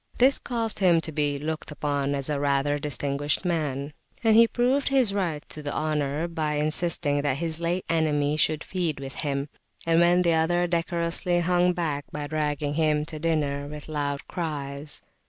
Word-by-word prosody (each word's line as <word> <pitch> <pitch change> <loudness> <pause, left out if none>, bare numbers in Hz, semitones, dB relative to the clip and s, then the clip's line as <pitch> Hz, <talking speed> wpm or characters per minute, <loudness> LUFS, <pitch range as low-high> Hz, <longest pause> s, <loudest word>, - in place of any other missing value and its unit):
This 265 +2 +4
caused 230 -4 -2
him 175 -4 +5
to 160 - -3
be 145 -1 0
looked 155 +2 -4
upon 145 -2 -1
as 140 -1 -3
rather 145 -1 +1
a 145 - -1
distinguished 145 +1 -1
man, 150 -4 -1 0.3
and 220 -1 +5
he 230 +1 +8
proved 255 +5 +1
his 260 -7 +3
right 170 -7 -2
to 155 - -6
the 145 -1 -4
honour 150 0 -1
by 155 -3 -2
insisting 150 -1 +1
that 140 -2 0
his 165 0 -2
late 170 +2 -1
enemy 150 -3 +1
should 155 0 +1
feed 170 -6 -2
with 135 -1 -6
him, 140 -1 -2 0.4
and 165 0 +3
when 175 +1 +4
the 170 -1 +3
other 175 +2 +2
decorously 170 +1 0
hung 180 +1 +2
back, 155 -5 -2
by 150 -1 -4
dragging 150 -1 -1
him 150 -1 +1
to 155 0 -7
dinner 145 -3 0
with 150 0 -8
loud 145 -2 -3
cries. 145 -3 -5
155 Hz, 175 wpm, -26 LUFS, 145-170 Hz, 0.4 s, he